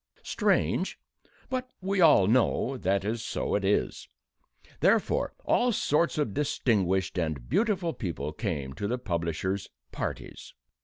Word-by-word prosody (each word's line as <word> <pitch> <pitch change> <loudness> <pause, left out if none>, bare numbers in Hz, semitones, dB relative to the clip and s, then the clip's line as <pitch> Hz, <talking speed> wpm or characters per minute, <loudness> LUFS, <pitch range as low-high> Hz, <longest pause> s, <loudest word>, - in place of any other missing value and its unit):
Strange - - +1 0.5
but 255 -1 -3
we 195 0 0
all 150 - +7
know 125 +4 +2
that 100 -4 0
so 110 - -3
it 100 - +1
is. 100 +2 0 0.7
Therefore, - - +2
all 245 0 +3
sorts 170 -6 +1
of 145 -9 0
distinguished 95 - +1
and 80 -7 -2
beautiful 195 -7 +1
people 80 - -4
came 70 -5 -3
to 100 +9 -3
the 125 +4 -1
publisher's 90 -1 -2 0.2
"parties." - - -6
100 Hz, 120 wpm, -28 LUFS, -, 0.7 s, all